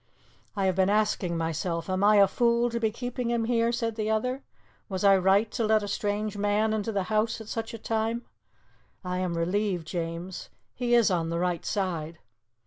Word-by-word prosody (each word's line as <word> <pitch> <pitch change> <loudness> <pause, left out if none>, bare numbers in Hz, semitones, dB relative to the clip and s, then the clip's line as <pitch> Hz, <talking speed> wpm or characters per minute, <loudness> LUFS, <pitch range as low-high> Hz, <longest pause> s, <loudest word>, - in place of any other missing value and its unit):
"I 195 -2 0
have 185 -2 +2
been 190 0 +3
asking 205 -4 +1
myself: 165 +1 -2
am 185 +1 -1
I 210 +1 +6
a 200 -1 +7
fool 235 +3 +2
to 235 - -2
be 225 -1 +1
keeping 245 +2 -4
him 235 -1 0
here?" 230 0 +2
said 230 -1 -1
the 215 0 -1
other. 250 +5 0 0.5
"Was 190 -1 -3
I 200 -1 +7
right 195 +3 +3
to 230 - -1
let 215 -1 +3
a - - -4
strange 205 +1 -2
man 205 +2 +1
into 220 +1 -1
the 200 -3 0
house 215 +2 +1
at 220 - -10
such 225 0 -4
a - - -6
time? 225 +2 -2 0.8
I 180 0 -2
am 180 -2 -2
relieved, 180 0 0
James. 170 +2 -5 0.2
He 240 -1 +1
is 230 -4 +4
on 165 -2 0
the 170 - -2
right 175 -1 -1
side." 170 -5 -2
205 Hz, 200 wpm, -27 LUFS, 185-225 Hz, 0.8 s, a